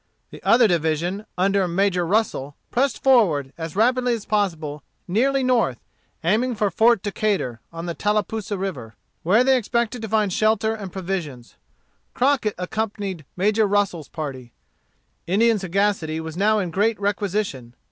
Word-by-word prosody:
The - - -11
other 235 -1 +5
division, 175 +4 -1
under 195 0 +2
Major 180 0 +1
Russel, 165 -9 0 0.2
pressed 265 +1 0
forward, 175 - +3
as 165 0 -6
rapidly 245 +3 +2
as 220 - -8
possible, 165 -8 -1 0.3
nearly 265 +8 +2
north, 235 - +2 0.5
aiming 225 +8 +1
for 205 -2 0
Fort 225 +2 +3
Decatur, 200 - -1
on 165 0 -6
the 170 - -3
Tallapoosa 210 +1 -1
River, 135 - -5 0.3
where 210 +8 +4
they 265 +1 +4
expected 235 0 -1
to 220 - -5
find 210 -3 +1
shelter 220 +1 +2
and 200 -4 -7
provisions. 170 -10 -5 0.6
Crockett 255 -5 +1
accompanied 195 -3 -4
Major 210 +3 +2
Russel's 195 -6 0
party. 135 -6 -6 0.7
Indian 220 +4 +3
sagacity 190 -4 0
was 160 0 -6
now 210 +4 +3
in 185 -5 -2
great 210 +5 +1
requisition. 200 - -2
200 Hz, 140 wpm, -23 LUFS, 170-220 Hz, 0.7 s, other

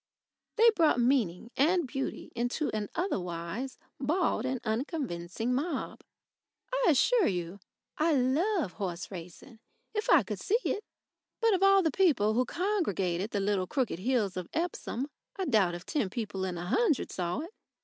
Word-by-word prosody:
They 465 0 +7
brought 325 - +3
meaning 235 -5 +1
and 335 +4 +3
beauty 270 +2 -4
into 245 +6 -1
an 210 -1 -2
otherwise 190 - -3 0.2
bald 290 -4 +1
and 260 -1 -1
unconvincing 225 - -2
mob. 285 +2 -2 0.7
I - - +2
assure 400 - +4
you 180 +1 -3 0.4
I 320 +2 +3
love 290 - +1
horse 185 -3 -4
racing 180 +6 -10 0.3
if 425 -1 -2
I - - +7
could 205 -1 -5
see 420 - +2
it. 415 - -1 0.6
But 455 -2 +3
of 375 - +1
all 390 -1 +6
the 320 - +2
people 265 - +3
who 250 +3 +2
congregated 215 - -1
the 205 - -1
little 195 -2 0
crooked 250 - -1
hills 220 -3 0
of 180 -2 -4
Epsom, 315 -6 -2 0.3
I 385 - -2
doubt 205 - +3
if 175 - -9
ten 280 -11 -1
people 200 -3 -3
in 180 -2 -3
a 175 - -5
hundred 310 - +1
saw 175 +6 -2
it. 335 +5 -8
250 Hz, 160 wpm, -30 LUFS, -, 0.7 s, They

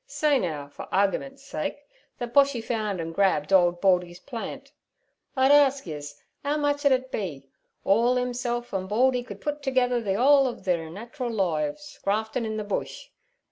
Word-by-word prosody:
Say 295 -3 +2
now 155 - -3
for 145 - -10
r 195 - +4
ar 195 - 0
rgimen's 275 +4 -6
sake 280 - -5 0.3
thet 240 -1 -5
Boshy 280 -2 +4
found 215 -4 -2
an' 165 0 -4
grabbled 185 -4 +1
ould 175 -2 +4
Baldy's 180 -2 +2
plant: 235 +1 -7 0.7
I'd 265 +1 +5
arsk 280 -1 +5
yez 145 -3 -7 0.2
'ow 290 +1 0
much 290 0 0
ud - - +4
it 260 0 +1
be—orl 190 - -1
himself 245 -1 -2
an' 190 -1 -2
Baldy 250 +5 +2
could 245 - -10
put 295 0 -3
together 255 -3 +1
the 195 -3 -1
whole 275 +2 +5
ov 245 - -6
thir 170 -3 0
nat'ral 235 - -6
loives 185 - -2
graftin' 220 +3 -1
in 220 0 -3
ther 215 - -2
Bush? 210 - -4
230 Hz, 175 wpm, -26 LUFS, 185-260 Hz, 0.7 s, I'd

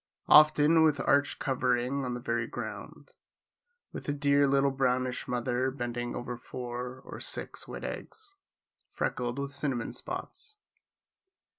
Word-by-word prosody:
Often 155 +1 +7
with 155 -3 +4
arched 145 0 +3
covering, 130 0 0
on 125 -1 -2
the - - -4
very 115 -1 -1
ground, - - -7 0.8
with - - -6
the 145 - 0
dear 140 0 +3
little 140 0 +3
brownish 130 0 0
mother 125 +1 0
bending 120 -2 -4
over 120 0 -4
four 125 +1 -6
or - - -8
six - - -5
white - - -7
eggs, 420 -3 -7 0.6
freckled 120 0 -2
with 140 0 -3
cinnamon 140 -4 -2
spots. 425 - -7
130 Hz, 130 wpm, -30 LUFS, 125-145 Hz, 0.8 s, Often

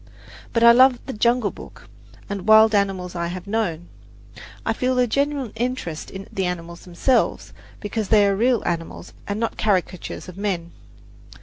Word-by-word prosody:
But 230 - +1
I 235 - +9
love 255 +1 +6
"The 265 - -5
Jungle 235 0 +1
Book" - - -13 0.4
and 200 -1 -5
"Wild 220 0 +7
Animals 195 -3 0
I 170 -1 -2
Have 180 +2 -6
Known." 195 -6 -2 0.8
I - - +1
feel 255 0 -1
a 250 - +4
genuine 280 0 -1
interest 240 -10 -4
in 195 0 -9
the 190 -3 -1
animals 170 -1 -6
themselves, 210 +8 0 0.3
because 210 0 -3
they 210 -1 +5
are 200 -1 +2
real 235 +2 +2
animals 165 -1 -4
and 205 +1 -3
not 230 - -3
caricatures 185 -4 -1
of 180 0 -10
men. 180 -5 -2
205 Hz, 165 wpm, -22 LUFS, 180-235 Hz, 0.8 s, I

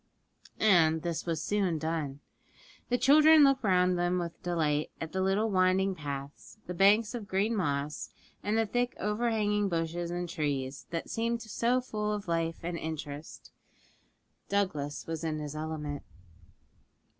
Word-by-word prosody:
And 160 -6 +4
this 170 0 -3
was 160 -2 -1
soon 190 -3 0
done. 155 -3 -3 0.7
The 245 - +2
children 305 +3 +7
looked 275 -2 +4
round 180 -2 +3
them 175 +1 +1
with 170 -1 -4
delight 155 -4 0
at 160 - -5
the 190 - -1
little 200 +4 +1
winding 190 +1 +3
paths, 145 +1 -7
the 180 - -5
banks 205 +5 +4
of 230 -4 -5
green 200 +4 +1
moss, 145 -5 -2 0.3
and 210 +2 0
the 225 - +3
thick 245 +3 -1
overhanging 210 -1 +1
bushes 170 0 -2
and 175 0 -3
trees, 140 -4 -3
that 165 -1 -4
seemed 230 +1 -1
so 235 +3 +1
full 210 -3 -2
of 205 -2 -5
life 165 -1 0
and 170 0 -3
interest. 155 -1 -7 1.0
Douglas 180 -8 -1
was 165 0 -4
in 155 -1 -1
his 150 -1 -5
element. 155 -2 -4
175 Hz, 145 wpm, -30 LUFS, 160-210 Hz, 1.0 s, children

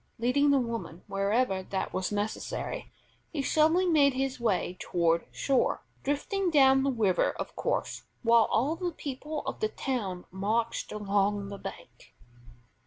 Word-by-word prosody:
Leading 255 +5 +3
the 280 - +5
woman 230 -8 -3
wherever 200 +1 +1
that 190 +1 -4
was 185 +1 -1
necessary, 205 +1 -3 0.4
he 290 -4 -3
slowly 320 +6 +3
made 295 -6 +4
his 265 -1 -1
way 200 -5 0
toward 170 -1 +1
shore, 270 -2 +1 0.2
drifting 355 +7 -1
down 270 -4 +5
the 275 - +1
river, 210 -7 +2
of - - -6
course, - - -2 0.2
while 230 -1 +6
all 275 +8 +1
the 355 0 -2
people 295 +2 -5
of - - -4
the 435 - 0
town 205 - -3
marched 220 +5 -1
along 205 -1 0
the 200 -1 -7
bank. - - -10
235 Hz, 145 wpm, -29 LUFS, 200-280 Hz, 0.4 s, while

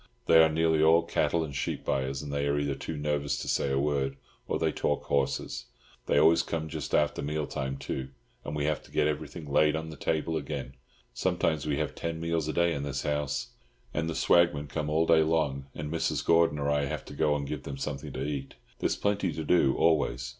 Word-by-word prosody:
They 80 - +7
are 80 - +4
nearly 80 0 +2
all 80 +2 +6
cattle 85 0 +1
and 70 -4 -6
sheep - - -3
buyers, 65 +1 -1
and 70 -1 -6
they 70 0 0
are 70 0 +1
either 70 -1 0
too 75 +3 -5
nervous 75 -1 -1
to - - -5
say 70 - +1
a 70 - +1
word, 70 -1 0 0.3
or - - 0
they - - +1
talk - - -1
horses. 70 -1 -1 0.4
They - - +2
always 80 +1 +6
come 80 -1 -3
just 80 -3 -3
after 75 - +2
mealtime, 70 -3 -3
too, 65 -1 -4 0.3
and 75 - -5
we 75 -1 -1
have 75 -3 0
to - - -18
get - - +2
everything 75 +1 -3
laid 75 +2 +3
on 80 0 -4
the - - -8
table 80 +2 -1
again—sometimes 70 +2 -3
we 70 - 0
have - - -2
ten 85 -1 -4
meals 85 -2 -1
a 80 - -2
day 85 0 +2
in 70 - -3
this 70 0 -3
house. 75 -2 -1 0.4
And 80 +1 -1
the 80 - -3
swagmen 85 -4 +3
come 75 +1 -3
all 80 +2 +2
day 80 -1 +5
long, 75 -4 0
and 75 0 -5
Mrs. 85 - -1
Gordon 85 -3 +4
or 70 0 0
I 70 -1 +1
have 70 - -4
to - - -10
go 75 0 +2
and 70 -1 -2
give 75 0 -4
them 70 - -6
something 70 0 -4
to 65 - -3
eat; 70 -2 -4 0.2
there's - - +1
plenty 100 -3 0
to 80 - -4
do, 75 -5 +3
always. 75 -6 +2
75 Hz, 220 wpm, -29 LUFS, 70-80 Hz, 0.4 s, They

